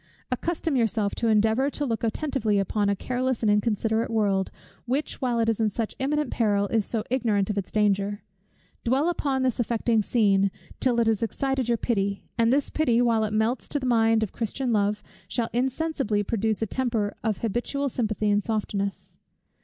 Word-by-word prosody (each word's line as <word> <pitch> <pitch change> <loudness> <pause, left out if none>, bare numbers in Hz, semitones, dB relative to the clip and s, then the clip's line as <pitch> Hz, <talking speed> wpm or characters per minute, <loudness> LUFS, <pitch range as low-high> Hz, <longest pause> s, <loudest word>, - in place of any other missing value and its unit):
Accustom 325 +3 -1
yourself 220 -4 +1
to 230 - -1
endeavour 220 +5 +3
to 290 0 -2
look 230 -3 -2
attentively 230 -3 0
upon 200 +1 +1
a 200 - +2
careless 255 +3 -2
and 210 - +4
inconsiderate 220 +2 +1
world, 200 -4 +1 0.4
which, 275 +5 -2
while 245 -2 0
it 225 - +2
is 225 -1 +1
in 220 -1 +2
such 220 +1 -3
imminent 290 0 0
peril, 205 -3 +1
is 220 -3 +1
so 225 -3 -2
ignorant 215 -6 +1
of 205 - -5
its 190 - -6
danger. 205 -1 +1 0.6
Dwell 270 +7 +2
upon 275 -6 0
this 255 -2 0
affecting 235 -1 +1
scene, 200 -3 +3 0.3
till 245 -2 +2
it 230 - +3
has 220 -2 +1
excited 265 +2 -1
your 235 - +3
pity; 200 -4 -1
and 230 0 +3
this 280 +2 +1
pity, 245 -7 +2
while 230 -2 +3
it 215 - -1
melts 220 +4 0
the 285 -3 -2
mind 225 -2 +3
to 220 - +1
Christian 240 +2 -2
love, 210 0 +1 0.2
shall 235 -2 -2
insensibly 260 -4 0
produce 220 0 -1
a - - +2
temper 225 -3 -1
of 220 -4 0
habitual 240 +6 -1
sympathy 215 -4 -1
and 205 0 +2
softness. 200 -3 -3
225 Hz, 180 wpm, -26 LUFS, 210-255 Hz, 0.6 s, and